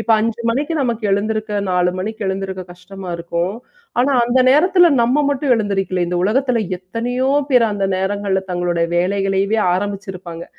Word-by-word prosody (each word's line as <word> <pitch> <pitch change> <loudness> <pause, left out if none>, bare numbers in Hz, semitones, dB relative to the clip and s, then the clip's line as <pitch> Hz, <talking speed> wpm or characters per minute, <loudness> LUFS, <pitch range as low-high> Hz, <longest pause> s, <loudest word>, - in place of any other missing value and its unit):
இப்ப 225 - -3
5 230 +1 -2
மணிக்கு 290 +7 -1
நமக்கு 235 -3 -2
எழுந்திருக்க, 210 +1 -1
4 180 0 +2
மணிக்கு 220 +3 -4
எழுந்திருக்க 190 -1 -3
கஷ்டமா 185 +1 -9
இருக்கும். 170 +3 -2 0.5
ஆனா 275 +3 +2
அந்த 250 +2 +2
நேரத்துல 345 +5 +5
நம்ம 260 +5 +2
மட்டும் 280 -2 +1
எழுந்திரிக்கல 195 -4 -1
இந்த 180 - -2
உலகத்துல 250 +4 +1 0.2
எத்தனையோ 240 +8 -2 0.2
பேரு 250 -4 +4
அந்த 200 -1 -2
நேரங்கள்ல 195 0 -1
தங்களுடைய 175 -1 0
வேலைகளையே 195 +3 +1
ஆரம்பிச்சிருப்பாங்க. 190 -3 -5
205 Hz, 140 wpm, -18 LUFS, 185-235 Hz, 0.5 s, நேரத்துல